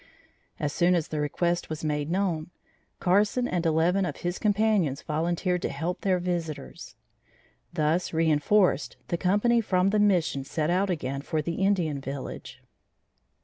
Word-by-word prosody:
As 145 -1 -2
soon 180 +1 +3
as 165 -3 -1
the 155 - -3
request 170 +4 -1
was 155 0 -5
made 150 -1 -1
known, 175 -4 -1 0.5
Carson 205 +7 +2
and 175 -2 0
eleven 165 +5 +2
of 180 - -3
his 175 +1 -3
companions 205 - +1
volunteered 175 +3 -1
to - - -1
help 175 +2 -3
their 190 -2 +2
visitors. 170 - -4 0.8
Thus 155 +4 0
reinforced, 160 - +2
the 170 - 0
company 210 +6 +3
from 185 -3 +2
the 215 - +2
Mission 180 -9 +2
set 155 +4 -1
out 190 +2 +1
again 140 -6 -2
for 155 +2 -2
the 170 +4 -2
Indian 170 -8 +1
village. 135 0 -7
175 Hz, 145 wpm, -27 LUFS, 155-190 Hz, 0.8 s, soon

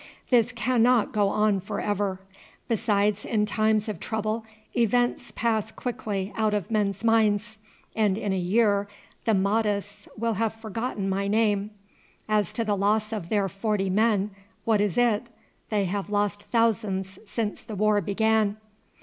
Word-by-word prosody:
This 245 -1 +4
cannot 245 -1 +2
go 205 -2 +2
on 210 -1 +2
for 190 - -5
ever. 205 -2 -1 0.5
Besides, 210 -2 +1
in 210 -2 +1
times 215 0 +1
of 215 - -4
trouble 220 0 -2 0.3
events 245 +1 +1
pass 220 -2 0
quickly 210 -6 -4
out 215 -1 +1
of 205 0 -3
men's 205 -2 0
minds, 215 -1 +2 0.4
and 210 -3 +2
in 205 -3 -1
a - - 0
year 200 +2 +2 0.4
the 225 - +3
Mahdists 205 0 0
will 230 +1 0
have 225 -1 0
forgotten 225 -2 -4
my 195 +1 0
name. 205 -1 +2 0.6
As 210 -3 +1
to 230 - -1
the 210 -1 +1
loss 210 +2 +1
of 190 -6 -4
their 205 -2 +2
forty 195 0 -1
men, 210 0 +2 0.3
what 220 -3 +3
is 205 -1 0
it? 235 -1 +2 0.4
They 205 -2 +1
have 200 +2 -3
lost 205 0 -1
thousands 210 -5 0
since 215 0 -3
the 220 -2 -8
war 210 +1 +3
began." 215 +1 +1
210 Hz, 150 wpm, -26 LUFS, 200-225 Hz, 0.6 s, This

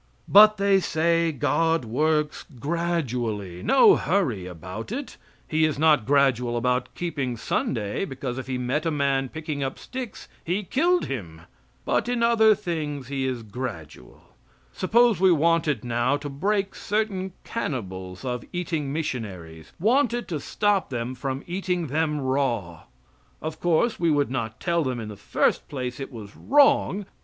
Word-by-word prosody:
But, 215 +1 +8
they 200 0 +4
say, 165 -1 +1
God 160 +1 +1
works 150 +6 0 0.2
gradually. 125 - -2
No 330 - +6
hurry 130 - 0
about 90 - -7
it. 270 +3 -5 0.3
He 160 0 +1
is 155 -2 +1
not 150 -6 +3
gradual 130 -4 +2
about 125 +1 0
keeping 140 -8 -3
Sunday, 105 - -1
because, 130 -5 -5
if 130 - -7
He 130 -1 -2
met 130 +6 -1
a - - +3
man 140 -3 0
picking 155 -1 -5
up 135 -1 -3
sticks, 255 -5 -7 0.2
He 185 +5 -1
killed 345 - +2
Him; 85 -12 -6 0.4
but - - +1
in 245 -1 0
other 220 -2 +5
things 150 -9 -4
He 135 -1 -1
is 125 -3 -3
gradual. 100 - -8 0.5
Suppose 230 +2 +3
we 190 0 +5
wanted 160 -6 +2
now 120 +4 +1
to 145 0 -6
break 195 +8 -1
certain 200 -3 -2
cannibals 95 - -5
of 125 -2 -3
eating 165 -5 -2
missionaries 95 - -5
wanted 240 - +2
to 160 -4 -2
stop 205 +6 0
them 120 -1 -3
from 135 +2 -4
eating 180 -1 -2
them 150 +1 0
raw? 125 - -1 0.5
Of 155 0 -5
course 175 +7 +1
we 170 -1 +2
would 145 -3 +2
not 115 -4 -3
tell 170 -1 +1
them, 130 -3 -2
in 110 -2 -6
the 105 - -7
first - - 0
place, 125 -2 -4
it 135 - -6
was 105 -4 -10
wrong. 275 -8 +3
145 Hz, 150 wpm, -25 LUFS, 125-175 Hz, 0.5 s, But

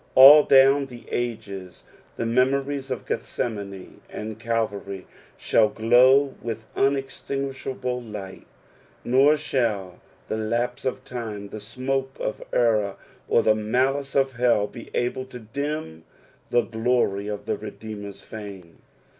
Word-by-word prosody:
All 140 +3 +11
down 135 +1 +5
the 120 -2 -12
ages 105 -6 -4 0.3
the - - -3
memories 135 +3 +1
ol 130 - 0
Gethsemane 100 -5 -4
and 110 0 -6
Calvary 100 -4 -2 0.3
shall 110 -2 +3
glow 130 +5 +4
with 115 -1 -5
uneitinguiahable 135 -3 -2
light; 95 -2 -8 0.6
nor 135 +5 +4
shall 115 -10 -1 0.3
the - - -2
lapse 120 +4 -2
of 130 0 -3
time, 110 -6 -6
Che 110 - -6
smoke 130 +5 -3
of 110 - -3
error, 110 -4 +2 0.3
or 115 - +3
the 110 - +5
malice 130 +6 0
of 135 -1 +2
hell 120 -4 +3
be 115 +2 -10
able 125 +1 -1
to 130 -1 -10
dim 125 - -5 0.5
the 120 - +4
glory 110 -3 0
of 105 -1 -5
the - - -1
Redeemer's 105 -2 -8
fame. 100 -6 -10
120 Hz, 125 wpm, -24 LUFS, 105-135 Hz, 0.6 s, All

